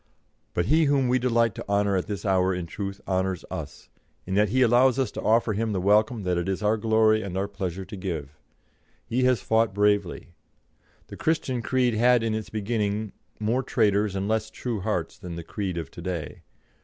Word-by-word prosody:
But 85 Hz, -, +1 dB
he 155 Hz, -, +4 dB
whom 140 Hz, -3 st, +2 dB
we 130 Hz, +1 st, +3 dB
delight 115 Hz, -3 st, +2 dB
to -, -, -8 dB
honour 100 Hz, -1 st, +2 dB
at 90 Hz, -, -1 dB
this 100 Hz, -1 st, -5 dB
hour 95 Hz, -1 st, +2 dB
in 90 Hz, -1 st, -4 dB
truth 100 Hz, +3 st, -5 dB
honours 95 Hz, -1 st, -1 dB
us, -, -, -7 dB, 0.4 s
in 95 Hz, -, -4 dB
that 105 Hz, +1 st, +3 dB
he 130 Hz, +4 st, +3 dB
allows 125 Hz, +2 st, +4 dB
us 135 Hz, -2 st, 0 dB
to -, -, -6 dB
offer 110 Hz, 0 st, +2 dB
him 110 Hz, +1 st, -1 dB
the 95 Hz, -, 0 dB
welcome 105 Hz, +3 st, +2 dB
that 90 Hz, -1 st, 0 dB
it 85 Hz, +2 st, -2 dB
is 95 Hz, +2 st, -2 dB
our 105 Hz, +1 st, +3 dB
glory 110 Hz, 0 st, +3 dB
and 95 Hz, -3 st, -5 dB
our 100 Hz, +1 st, 0 dB
pleasure 95 Hz, -2 st, -5 dB
to -, -, -8 dB
give. 85 Hz, -7 st, -4 dB, 0.7 s
He 125 Hz, +2 st, 0 dB
has 125 Hz, -5 st, +2 dB
fought 110 Hz, -3 st, +2 dB
bravely. 105 Hz, -4 st, +1 dB, 0.8 s
The -, -, -9 dB
Christian 140 Hz, -6 st, 0 dB
creed 125 Hz, -1 st, +1 dB
had 120 Hz, +1 st, +4 dB
in 115 Hz, -1 st, 0 dB
its 110 Hz, -2 st, -4 dB
beginning 105 Hz, -1 st, -2 dB, 0.3 s
more 115 Hz, +4 st, +1 dB
traitors 105 Hz, -5 st, +1 dB
and 95 Hz, +1 st, -2 dB
less 110 Hz, 0 st, 0 dB
true 115 Hz, 0 st, -4 dB
hearts 95 Hz, -, -3 dB
than 90 Hz, -2 st, -7 dB
the 85 Hz, -, -6 dB
creed 95 Hz, +1 st, -4 dB
of 80 Hz, -5 st, -5 dB
to -, -, -10 dB
day. 85 Hz, -5 st, -5 dB
105 Hz, 205 wpm, -26 LUFS, 95-115 Hz, 0.8 s, he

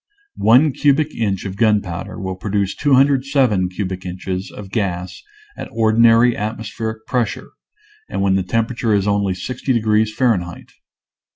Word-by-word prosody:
One 130 Hz, +7 st, +5 dB
cubic 145 Hz, +3 st, +1 dB
inch 100 Hz, -5 st, -2 dB
of 95 Hz, -1 st, -5 dB
gunpowder 100 Hz, -5 st, 0 dB
will 95 Hz, -1 st, -4 dB
produce 100 Hz, 0 st, -2 dB
207 135 Hz, -7 st, +2 dB
cubic 95 Hz, 0 st, -5 dB
inches 90 Hz, +1 st, -5 dB
of 100 Hz, -2 st, -11 dB
gas 95 Hz, -4 st, -3 dB, 0.3 s
at -, -, -8 dB
or 110 Hz, -1 st, +1 dB
dinary 115 Hz, +1 st, +5 dB
atmospheric 110 Hz, +1 st, -5 dB
pressure 125 Hz, -3 st, -2 dB, 0.6 s
and -, -, -4 dB
when 95 Hz, -1 st, +2 dB
the 95 Hz, -, +2 dB
temperature 115 Hz, +3 st, 0 dB
is 100 Hz, 0 st, 0 dB
only 100 Hz, -2 st, +1 dB
60 125 Hz, +8 st, -4 dB
degrees 110 Hz, -2 st, +2 dB
Fahrenheit. 100 Hz, -9 st, -1 dB
110 Hz, 135 wpm, -19 LUFS, 95-120 Hz, 0.6 s, One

